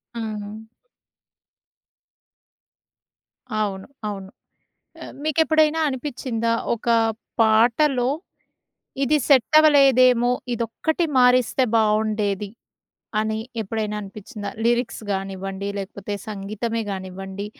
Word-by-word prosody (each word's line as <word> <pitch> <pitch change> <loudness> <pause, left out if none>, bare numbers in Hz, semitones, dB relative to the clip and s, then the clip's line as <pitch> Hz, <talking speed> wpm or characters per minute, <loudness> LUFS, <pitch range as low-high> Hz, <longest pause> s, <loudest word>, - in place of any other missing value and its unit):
హ్మ్. 215 -1 -6 2.9
అవును. 195 -2 -2 0.2
అవును. 195 -2 -7 0.7
ఆహ్, - - -9
మీకెప్పుడైనా 315 0 +3
అనిపిచిందా? 250 -4 -2 0.2
ఒక 235 +1 -7 0.5
పాటలో, 240 +4 +3 0.9
ఇది 275 +3 +3
సెట్ 265 -1 +5
అవ్వలేదేమో 255 -5 +5 0.2
ఇదొక్కటి 240 +9 -1
మారిస్తే 250 +1 +4
బావుండేది 210 -2 +1 0.7
అని 220 0 -1 0.2
ఎప్పుడైనా 215 0 -3
అనిపిచిందా 205 +1 -8
లిరిక్స్ 235 0 0
కానివ్వండి 195 0 -4
లేకపోతే 200 +1 -5
సంగీతమే 215 +3 -3
కానివ్వండి. 190 +1 -6
220 Hz, 75 wpm, -23 LUFS, 205-250 Hz, 2.9 s, సెట్